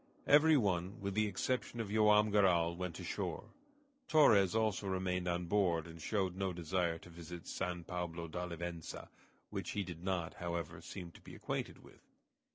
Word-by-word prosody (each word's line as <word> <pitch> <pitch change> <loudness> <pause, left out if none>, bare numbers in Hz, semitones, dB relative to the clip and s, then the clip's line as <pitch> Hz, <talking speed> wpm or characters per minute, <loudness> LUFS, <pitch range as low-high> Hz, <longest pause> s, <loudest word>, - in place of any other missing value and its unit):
Every 150 +2 +7
one, 95 -4 0
with 100 0 -3
the 110 +1 +2
exception 120 +4 -2
of 110 -3 -3
Joam 105 0 +5
Garral, 90 -5 +4
went 90 -1 -4
ashore. - - -4 0.6
Torres 105 - +5
also 110 -3 +1
remained 90 -1 -1
on 90 0 0
board, 85 -3 +2
and 80 -1 -10
showed 95 0 0
no 95 0 -1
desire 85 0 0
to 85 - -14
visit 85 0 -9
San 90 -2 -3
Pablo 85 -1 -4
d'Olivença, 85 0 -5 0.4
which - - -4
he 100 - -1
did 85 -2 -8
not, 90 -3 -1
however, 85 -2 -4
seem 90 -3 -8
to - - -16
be - - -11
acquainted - - -4
with. - - -17
90 Hz, 165 wpm, -35 LUFS, 85-100 Hz, 0.6 s, Every